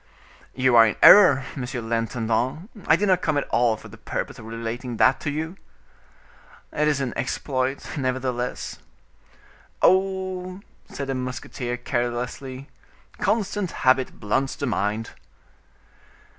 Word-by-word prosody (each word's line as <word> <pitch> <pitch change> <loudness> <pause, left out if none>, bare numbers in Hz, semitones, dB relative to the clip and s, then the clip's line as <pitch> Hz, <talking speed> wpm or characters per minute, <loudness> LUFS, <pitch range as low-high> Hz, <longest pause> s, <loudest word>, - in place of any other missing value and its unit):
"You 130 -1 +3
are 115 0 +8
in 105 - -1
error, 140 -11 +8
monsieur 130 -2 -4
l'intendant, 115 - -2 0.2
I 160 - +6
did 205 +5 0
not 185 -2 +4
at 145 -3 0
all 120 -2 +2
come - - -15
for - - -9
the - - -14
purpose - - -5
of - - -10
relating 115 +1 -5
that 130 - +4
to 145 - -3
you." 160 +5 -4 1.2
"It 150 0 +1
is 145 -2 +1
an 125 -3 -2
exploit, 130 +1 -2
nevertheless." 130 -2 -3 1.0
"Oh!" 185 0 +1 0.3
said 140 - -5
the 135 - -2
musketeer 125 -1 -4
carelessly, 125 +3 -3 0.5
"constant 205 -3 0 0.2
habit 130 0 +3
blunts 130 +6 -1
the 140 - -3
mind." 110 -2 -2
130 Hz, 130 wpm, -24 LUFS, 120-150 Hz, 1.2 s, are